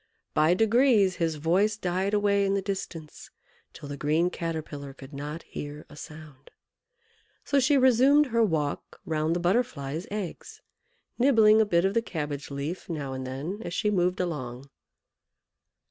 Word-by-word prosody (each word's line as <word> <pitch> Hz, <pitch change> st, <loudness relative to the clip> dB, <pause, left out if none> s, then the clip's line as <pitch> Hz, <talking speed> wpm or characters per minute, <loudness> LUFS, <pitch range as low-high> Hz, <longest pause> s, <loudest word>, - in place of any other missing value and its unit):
By 155 Hz, +3 st, +4 dB
degrees 220 Hz, -3 st, +3 dB
his 165 Hz, -3 st, 0 dB
voice 185 Hz, +8 st, +1 dB
died 190 Hz, +1 st, -1 dB
away 200 Hz, -1 st, +2 dB
in 195 Hz, 0 st, +1 dB
the 200 Hz, -, 0 dB
distance, 185 Hz, -5 st, -6 dB, 0.4 s
till 145 Hz, -, -10 dB
the 140 Hz, 0 st, -6 dB
green 155 Hz, +5 st, +1 dB
Caterpillar 155 Hz, -5 st, -5 dB
could 135 Hz, +1 st, -12 dB
not 150 Hz, +4 st, -6 dB
hear 145 Hz, +1 st, -8 dB
a -, -, -12 dB
sound. 150 Hz, -3 st, -12 dB, 1.0 s
So 280 Hz, -, +2 dB
she 280 Hz, +2 st, +3 dB
resumed 260 Hz, +3 st, +5 dB
her 230 Hz, -, +3 dB
walk 160 Hz, -9 st, -1 dB
round 155 Hz, +1 st, 0 dB
the -, -, 0 dB
Butterfly's 175 Hz, -, -1 dB
eggs, 210 Hz, -, -6 dB, 0.6 s
nibbling 220 Hz, -4 st, +6 dB
a 215 Hz, -, +2 dB
bit 170 Hz, -2 st, +2 dB
of 195 Hz, -, +1 dB
the 230 Hz, -, +2 dB
cabbage 150 Hz, -8 st, -5 dB
leaf 145 Hz, +7 st, -5 dB
now 145 Hz, -5 st, -4 dB
and 130 Hz, 0 st, -5 dB
then 150 Hz, +11 st, -5 dB
as 175 Hz, -, -5 dB
she 210 Hz, -, +1 dB
moved 180 Hz, -2 st, +1 dB
along. 135 Hz, -6 st, -4 dB
175 Hz, 155 wpm, -27 LUFS, 150-210 Hz, 1.0 s, nibbling